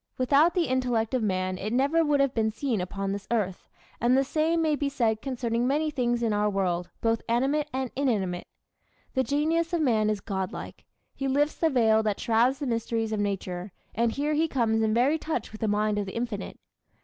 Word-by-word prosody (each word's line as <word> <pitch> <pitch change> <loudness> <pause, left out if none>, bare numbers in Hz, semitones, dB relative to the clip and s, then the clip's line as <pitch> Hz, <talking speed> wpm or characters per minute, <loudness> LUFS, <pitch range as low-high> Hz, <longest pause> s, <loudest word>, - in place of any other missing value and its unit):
Without 285 +7 +4
the 350 -2 +2
intellect 250 -3 0
of 255 - +1
man 185 -3 -1
it 210 +3 -3
never 280 +7 +3
would 295 -2 +2
have 275 -2 +2
been 220 -1 +1
seen 225 -2 -2
upon 195 +2 -3
this 200 0 -5
earth; 200 -6 -2 0.3
and 245 +3 +3
the 270 - +4
same 315 +4 +1
may 315 -2 +2
be 285 -1 -1
said 225 -5 0
concerning 240 -2 -1
many 305 +3 +1
things 240 -3 0
in 225 -2 +1
our 210 0 +2
world, 180 -3 -1
both 225 0 +1
animate 275 +6 +1
and 260 -1 -3
inanimate. 205 -10 -1 0.7
The 260 - +2
genius 320 +5 0
of 340 - +1
man 220 -7 +2
is 210 -1 0
God 190 -3 -3
like. - - -9 0.3
He 270 - -3
lifts 290 +3 +1
the 325 - +2
veil 225 -5 +4
that 210 -2 -1
shrouds 235 +4 +2
the 285 - -4
mysteries 230 -2 -1
of 215 - -1
nature, 190 -2 -3 0.2
and 235 0 +1
here 290 +5 -1
he 315 +2 +2
comes 230 -6 +1
in 220 -1 +2
very 260 +8 +2
touch 305 -9 -3
with 215 - -11
the 220 - +1
mind 210 0 +1
of 200 - -3
the 190 - -7
Infinite. 230 -4 -4
235 Hz, 210 wpm, -27 LUFS, 215-280 Hz, 0.7 s, Without